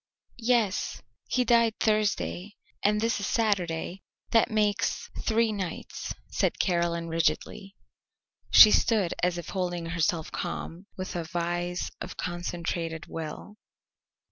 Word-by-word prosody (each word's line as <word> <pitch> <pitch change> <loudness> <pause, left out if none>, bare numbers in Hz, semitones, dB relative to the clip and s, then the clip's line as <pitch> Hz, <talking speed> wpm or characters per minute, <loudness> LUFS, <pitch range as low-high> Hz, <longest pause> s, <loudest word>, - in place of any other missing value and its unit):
"Yes. 230 -4 +1 0.3
He 250 -1 +2
died 235 -1 +4
Thursday 210 -2 0 0.3
and 210 +1 +3
this 230 -1 +1
is 200 - -2
Saturday; 185 -5 0 0.3
that 225 - +4
makes 210 0 0
three 225 0 +2
nights," 190 -5 -5 0.2
said - - +1
Caroline 170 -2 0
rigidly. 165 +5 -1 0.7
She 215 - +10
stood 210 -7 +3
as 180 0 +1
if 175 - -6
holding 175 -3 -2
herself 165 0 -1
calm 175 +4 -5
with 185 -1 -5
a 170 - -1
vise 175 +1 -2
of - - -6
concentrated 170 -2 -3
will. 165 +6 -7
185 Hz, 115 wpm, -28 LUFS, 170-215 Hz, 0.7 s, She